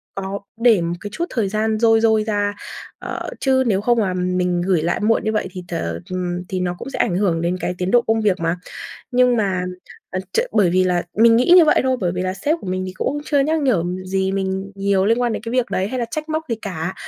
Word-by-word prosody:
có 195 +1 -4 0.2
để 230 -7 +5
một 170 +1 -1
cái 205 - -5
chút 340 - -2
thời 215 -6 -1
gian 215 +1 0
dôi 225 -1 +4
dôi 220 -1 +3
ra, 205 -1 -1 0.5
ờ, - - -5
chứ 265 -1 +2
nếu 200 -3 +1
không 240 +1 +2
mà 190 -4 0
mình 180 -1 0
gửi 180 -3 +1
lại 170 +2 0
muộn 220 +2 +2
như 220 - 0
vậy 215 - -1
thì, 180 -1 -7
ờ, 85 - -3
ừm, 180 -1 -3
thì 185 - -2
nó 180 -1 -1
cũng 245 - -7
sẽ - - -6
ảnh 175 - +1
hưởng 180 -5 +1
đến 175 +2 0
cái 180 - -2
tiến 180 +1 -2
độ 240 - +5
công 225 0 +2
việc 200 -3 +1
mà. 165 +1 0 0.6
Nhưng 250 0 +3
mà, 190 -4 0 0.5
ờ, 185 - -2
ch - - -1
bởi 205 -5 +3
vì 185 +1 +3
là 180 -1 +1 0.2
mình 230 0 +7
nghĩ 250 +8 +4
như 345 - +8
vậy 310 - +4
thôi. 260 0 +1
Bởi 175 -3 0
vì 180 - -2
là 185 0 -2
sếp 290 - 0
của - - -9
mình 185 0 -2
thì 185 - -6
cũng 275 +10 -2
chưa 290 - +1
nhắc 310 +3 +1
nhở 240 -11 +2 0.2
gì 190 0 0
mình 190 0 -2
nhiều 195 -1 +1
liên 230 +2 +2
quan 240 -2 +1
đến - - -4
cái 230 +1 -5
việc 250 -1 0
đấy 190 +1 0
hay 255 - -3
là 240 - 0
trách 310 +4 -4
móc 315 0 -1
gì 230 - 0
cả. 180 -2 -4
195 Hz, 265 wpm, -20 LUFS, 180-230 Hz, 0.6 s, như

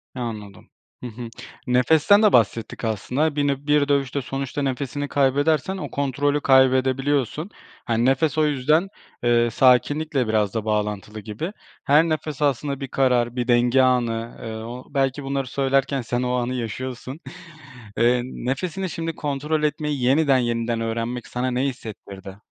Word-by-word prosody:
Anladım. 110 -5 -7 0.3
Hı - - -3
hı, 120 +1 -8 0.4
nefesten 155 - +4
de 210 - +5
bahsettik 115 0 +1
aslında. 130 +8 -1
Bir 145 -1 +1
nö 140 - +2
bir 150 -1 +3
dövüşte 140 -1 0
sonuçta 135 +2 -4
nefesini 140 +1 -2
kaybedersen 145 +6 +1
o - - -6
kontrolü 140 +1 0
kaybedebiliyorsun. 130 - +2 0.4
Hani 115 0 +1
nefes 135 +4 +2
o 155 -1 +3
yüzden, 150 +5 +2 0.4
eee, 120 0 +3
sakinlikle 135 +2 +2
biraz 105 -2 +1
da 110 -2 -3
bağlantılı 105 0 -2
gibi. 110 - -5 0.3
Her 150 +1 +5
nefes 155 -2 -3
aslında 140 -1 0
bir 135 - -5
karar, 125 -3 +1
bir 125 -1 -2
denge 120 +1 +4
anı, 120 -3 0
eee, 115 - -5
o 120 +3 -7
belki 135 0 0
bunları 135 -1 -2
söylerken 135 +1 0
sen 120 +1 -2
o 125 0 -1
anı 125 0 -1
yaşıyorsun. 130 +3 -5 0.8
Eee, 120 +1 +3
nefesini 155 +9 -3
şimdi 165 -1 -4
kontrol 150 +2 -2
etmeyi 150 -2 -1
yeniden, 135 +2 +4
yeniden 115 -1 -1
öğrenmek 115 +2 -3
sana 125 +1 -2
ne 125 +1 0
hissettirdi? 100 -7 -7
130 Hz, 145 wpm, -23 LUFS, 120-145 Hz, 0.8 s, de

